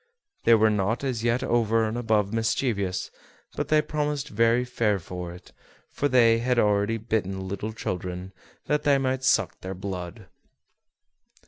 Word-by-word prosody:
They 115 - +7
were 110 0 +4
not 105 +4 0
as 125 -5 -2
yet 120 +2 +1
over 115 -1 +2
and 110 - -3
above 110 -4 +1
mischievous, 110 -4 -1 0.4
but - - -2
they 155 0 +3
promised 150 -1 -2
very 115 +2 +2
fair 115 -4 0
for 90 0 -7
it, 90 +1 -13 0.4
for 145 - 0
they 115 -4 +4
had 125 +1 0
already 105 0 +2
bitten 95 -4 -2
little 100 +3 -4
children, 90 -2 -5 0.3
that 150 0 +1
they 140 -1 +3
might 130 -1 -1
suck 130 - +1
their 95 +1 -5
blood. 95 +1 -6
110 Hz, 150 wpm, -26 LUFS, 95-125 Hz, 0.4 s, They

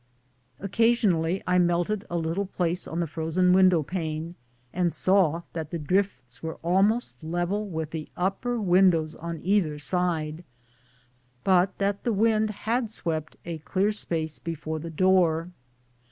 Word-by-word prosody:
Occasionally 195 -4 +2
I 180 0 +3
melted 175 +4 +1
a 175 - -2
little 170 +4 -1
place 180 -1 -2
on 165 - -4
the - - +1
frozen 165 +3 +1
window 185 -4 +5
pane, 160 0 -4 0.4
and 175 -1 +1
saw 175 -4 +2
that 160 -3 -4
the 170 - -3
drifts 150 -7 -1
were 160 0 -4
almost 195 +4 +1
level 175 +6 -1
with 160 -4 -4
the 160 -2 -5
upper 195 +7 -1
windows 175 -5 +3
on 170 0 -6
either 180 -5 +1
side, 160 0 -1 1.0
but 185 -1 +3
that 200 0 -1
the 235 - +1
wind 215 +1 +2 0.2
had 235 +1 +1
swept 160 -7 -3
a 170 -2 -5
clear 195 +6 0
space 160 -7 -3
before 160 -1 -4
the 165 +2 -6
door. 175 -1 +2
175 Hz, 140 wpm, -26 LUFS, 160-195 Hz, 1.0 s, window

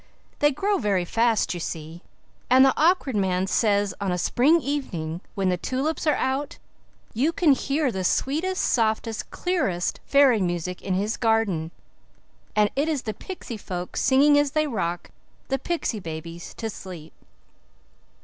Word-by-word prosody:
They 295 - +5
grow 395 +9 0
very 195 -5 +1
fast, 225 +2 +1
you 175 - -5
see, 165 0 -6 0.5
and 260 +1 +7
the 270 - +4
Awkward 315 -6 +2
Man 190 -2 +1
says 205 0 +1
on 195 -2 0
a 180 - 0
spring 270 - +3
evening, 180 - -3
when 195 -2 +1
the 180 - +1
tulips 280 - -2
are 300 - +4
out, 270 +4 -2 0.6
you 270 +9 +1
can 330 -2 +3
hear 275 +1 +1
the 190 -2 -3
sweetest, 320 - 0
softest, 220 -1 0
clearest, 270 - -1
fairy 275 -6 +5
music 175 0 -2
in 190 -2 -1
his 205 +4 -1
garden, 220 -9 +1 0.9
and 210 -1 +3
it 290 +4 +1
is 295 -5 -1
the 215 - -3
pixy 240 - -7
folk 180 -2 -6
singing 290 +2 +4
as 290 -1 0
they 310 0 +2
rock 175 - -3 0.4
the 270 0 0
pixy 295 -7 -2
babies 165 +1 -7
to 225 - -4
sleep." 175 -6 -10
225 Hz, 155 wpm, -25 LUFS, 185-285 Hz, 0.9 s, and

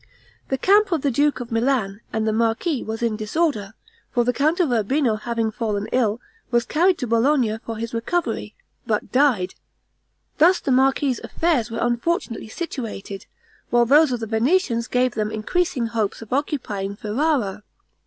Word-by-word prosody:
The 265 - 0
camp 400 +6 +4
of 320 -5 0
the 280 - +2
duke 290 +3 +2
of 240 0 -8
Milan 225 -4 0
and 220 0 -1
the 220 - +1
marquis 230 +6 0
was 220 +2 -4
in 230 -2 +1
disorder; 215 -2 -1 0.4
for 240 - +2
the 245 +1 +1
count 310 +7 +1
of 330 -7 +2
Urbino 240 +2 +1
having 225 0 -2
fallen 210 -2 -2
ill, 230 -3 +1 0.3
was 240 -1 +2
carried 350 +3 +2
to 255 - -3
Bologna 230 -1 +2
for 225 -1 -5
his 230 +1 -5
recovery, 285 +10 -2 0.3
but - - -1
died. 255 -9 +2 0.9
Thus 355 +4 +6
the 275 - -2
marquis's 265 0 +2
affairs 305 -9 0
were 230 - -5
unfortunately 240 - -1
situated, 220 - -6 0.4
while 240 0 +4
those 295 +3 +5
of 245 - -1
the - - -2
Venetians 235 - +1
gave 250 -1 +1
them 215 -1 -1
increasing 250 +4 -1
hopes 225 -2 -2
of 225 - -7
occupying 215 -9 -2
Ferrara. 215 -2 -1
240 Hz, 165 wpm, -22 LUFS, 220-290 Hz, 0.9 s, Thus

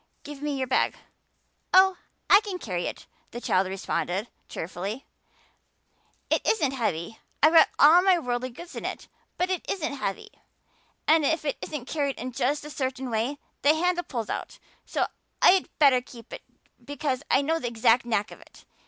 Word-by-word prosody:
Give 290 -1 -9
me 295 -1 -2
your 260 - -1
bag." 255 - +1 0.8
"Oh, 380 0 +6 0.3
I 400 - +7
can 405 -4 -5
carry 180 - -3
it," - - -7 0.2
the 240 - -7
child 185 -5 +1
responded 190 +2 -3 0.2
cheerfully. 195 +9 -5 1.3
"It - - +3
isn't 310 -12 +1
heavy. 220 -6 -3 0.2
I've 310 +2 +6
got 325 - +7
all 320 +5 +7
my 375 -1 +4
worldly 250 -4 -2
goods 340 +8 -11
in - - -6
it, - - -5 0.3
but 365 +1 0
it 370 - -2
isn't 320 -6 -2
heavy. 195 -8 -4 0.8
And 315 0 +5
if 320 +1 0
it 285 - -2
isn't 295 -5 -5
carried 280 -2 -1
in 255 +2 -5
just 285 +5 -1
a 300 - -8
certain 260 -2 -3
way 230 +6 -1 0.2
the 295 +2 +5
handle 350 +2 +1
pulls 230 -8 -4
out - - -5 0.3
so - - 0 0.3
I'd 375 0 +5
better 275 -4 +5
keep 235 -2 -13
it - - -7 0.4
because 285 -2 -3
I 280 - +3
know 325 +3 0
the 245 - -3
exact 235 +1 +3
knack 220 -3 -1
of - - -12
it. - - -19
275 Hz, 175 wpm, -26 LUFS, 235-320 Hz, 1.3 s, I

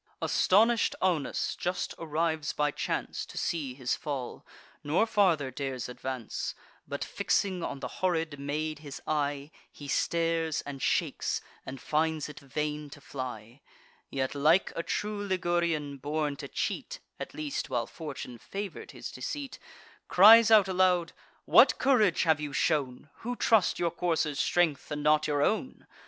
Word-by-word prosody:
Astonish'd 225 +4 +3
Aunus 170 -8 0
just 180 +1 -2
arrives 160 -1 -1
by 150 0 +1
chance, - - -3
To - - -11
see 145 -7 -2
his 125 -2 -1
fall; 135 -5 -5 0.4
nor 155 +9 +2
farther 180 -11 +2
dares 130 -1 -4
advance; 125 -1 -5 0.3
But, - - -3
fixing 190 -3 0
on 140 -4 -4
the - - -3
horrid 165 -5 0
maid 150 +2 -3
his 145 -3 -8
eye, 145 -1 -1 0.2
He 145 - -10
stares, 165 +1 0
and 140 -2 -8
shakes, - - 0 0.3
and 130 0 -6
finds 155 +2 0
it 150 0 -10
vain 150 +1 -4
to 145 - -12
fly; 125 -3 -7 0.5
Yet, 130 -1 -2
like 155 +6 +3
a - - -1
true 210 +4 -3
Ligurian, 170 -6 0
born 150 +1 -2
to - - -7
cheat, - - -3 0.2
(At - - -7
least 300 -3 -3
while 120 -2 0
fortune 140 -6 -8
favour'd 200 - -7
his - - -7
deceit,) 285 -3 -5 0.5
Cries 220 +4 +8
out 215 -3 +7
aloud: 180 -2 +2 0.3
"What - - +6
courage 230 - +3
have 160 -3 +3
you 145 -1 -4
shown, 145 -3 0
Who 245 +2 -4
trust 225 -5 +3
your 170 -1 0
courser's 160 -4 -1
strength, 170 -5 +1
and 150 -1 -4
not 155 0 +4
your 145 -1 +1
own? 220 - -1
155 Hz, 145 wpm, -29 LUFS, 140-180 Hz, 0.5 s, Cries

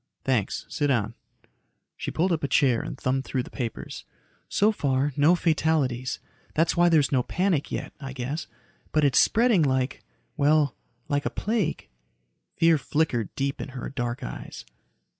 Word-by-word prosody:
"Thanks. 125 -7 0
Sit 145 - -1
down." 115 -5 +1 0.8
She - - -4
pulled 180 +3 +1
up 160 -3 0
a - - +1
chair 130 -3 +3
and - - -6
thumbed 130 +1 0
through 130 -2 -2
the - - -12
papers. 120 -5 -5 0.5
"So 210 +2 +3
far, 140 -6 0
no 150 +5 +5
fatalities. 155 -7 0 0.4
That's 165 +2 +2
why 175 0 +5
there's 155 -4 +3
no 130 -3 +3
panic 180 +1 0
yet, - - -4
I 135 -2 -6
guess. 135 +5 -4 0.5
But 155 -1 +3
it's 140 - +4
spreading 230 -5 +4
like... 130 -2 0 0.3
well, 145 -4 +3 0.3
like 145 -1 0
a - - 0
plague." 210 -7 -1 0.7
Fear 165 -2 +4
flickered 140 -8 -1
deep 140 0 -2
in - - -5
her 125 - -4
dark 120 0 -3
eyes. - - -7
145 Hz, 160 wpm, -26 LUFS, 130-160 Hz, 0.8 s, no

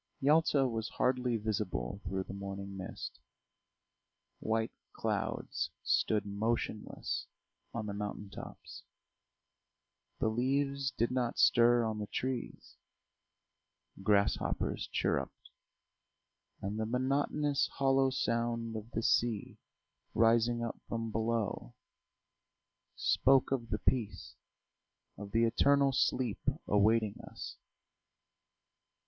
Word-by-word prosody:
Yalta 145 -1 +4
was 115 -2 -3
hardly 125 -2 +1
visible 100 - -2
through 95 0 -2
the 95 - -8
morning 100 0 -6
mist; 95 0 -6 1.2
white 110 0 0 0.2
clouds - - -2
stood 105 -1 +2
motionless 105 +1 -2 0.4
on 115 -2 -4
the 100 - -4
mountain 105 0 -4
tops. 100 - -10 1.4
The - - +1
leaves 135 +4 0
did 120 -2 0
not 125 -2 0
stir 120 0 +5
on 110 -1 -2
the 105 - -3
trees, 130 +1 -4 1.2
grasshoppers 100 0 +1
chirruped, - - -1 1.1
and 100 +3 -2
the 110 - -1
monotonous 140 +3 +1
hollow 135 -1 +3
sound 115 -3 -1
of 110 +1 -6
the 115 - -1
sea 115 -3 +1 0.6
rising 115 +1 +4
up 115 - -4
from 115 -1 -3
below, 110 - -1 1.2
spoke 135 -1 +3
of 120 -4 -1
the - - 0
peace, 120 -5 -1 0.8
of 100 0 -8
the 115 +3 +2
eternal 140 +4 +4
sleep 125 -3 +1 0.3
awaiting 105 +1 +3
us. - - -8
115 Hz, 100 wpm, -33 LUFS, 105-130 Hz, 1.4 s, stir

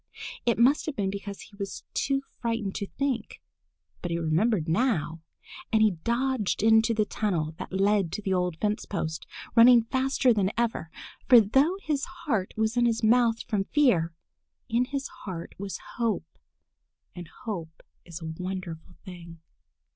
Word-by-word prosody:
It 235 - +3
must 260 +8 +4
have 305 - -3
been 195 -2 -1
because 200 0 -6
he 205 - -14
was 200 -2 -5
too 275 0 0 0.2
frightened 230 -4 -2
to 200 - -4
think. 265 -4 -3 0.6
But 175 - -3
he 170 - -1
remembered 170 +3 +1
now, 165 - 0 0.5
and 220 -1 +4
he 215 - +5
dodged 235 +4 -1
into 225 +1 +5
the 215 -1 +2
tunnel 170 -8 -1
that - - -6
led 195 -2 +2
to - - -3
the 190 - 0
old 180 -3 0
fence 210 +4 -1
post, 160 -4 -4 0.3
running 235 0 +7
faster 260 +1 +2
than 200 -3 +1
ever, 230 -8 -1 0.4
for 245 - +9
though 270 - +3
his 290 -3 -1 0.2
heart 215 - 0
was 220 +1 +1
in 240 -1 +3
his 230 -1 -1
mouth 230 0 +3
from 200 -2 -1
fear, 195 - +3 0.6
in 240 +1 +1
his 275 +1 -3 0.2
heart 175 -3 -6
was 200 -1 -4 0.2
hope, 230 -2 0 0.9
and 175 -2 -8 0.2
hope 170 -9 -6 0.2
is 170 -1 -9
a - - -6 0.2
wonderful 180 -2 -6
thing. 170 -3 -10
210 Hz, 160 wpm, -27 LUFS, 180-235 Hz, 0.9 s, for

